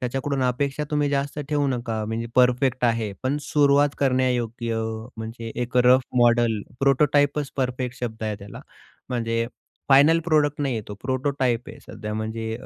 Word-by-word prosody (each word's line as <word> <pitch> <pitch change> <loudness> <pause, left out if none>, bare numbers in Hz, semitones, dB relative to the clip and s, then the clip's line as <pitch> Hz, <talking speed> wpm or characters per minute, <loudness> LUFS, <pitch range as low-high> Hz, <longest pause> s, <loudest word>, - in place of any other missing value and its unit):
त्याच्याकडून 135 +2 -2
अपेक्षा 135 +4 -1
तुम्ही 150 -1 +1
जास्त 140 +1 -2
ठेवू 145 -2 +1
नका. 115 -4 -2
म्हणजे 110 +2 -3
परफेक्ट 125 0 +3
आहे, 115 -3 +1
पण 130 +2 0
सुरुवात 145 0 +3
करण्यायोग्य. 125 -3 0 0.4
म्हणजे 115 +1 -6
एक 120 +1 -4
रफ 125 +1 +6 0.2
मॉडेल. 120 -3 +3 0.2
प्रोटोटाइपच 145 +1 +2
परफेक्ट 125 -1 -2
शब्द 110 -2 -5
आहे 110 -1 -2
त्याला. 100 0 -10 0.5
म्हणजे 115 -2 -1 0.4
फायनल 145 +4 +6
प्रॉडक्ट 150 -3 +2
नाहीये. 120 -6 -1
तो 105 - -6
प्रोटोटाइप 130 -2 -1
आहे. - - -10
सध्या 105 0 -7
म्हणजे 110 +1 -3
125 Hz, 140 wpm, -24 LUFS, 115-140 Hz, 0.5 s, रफ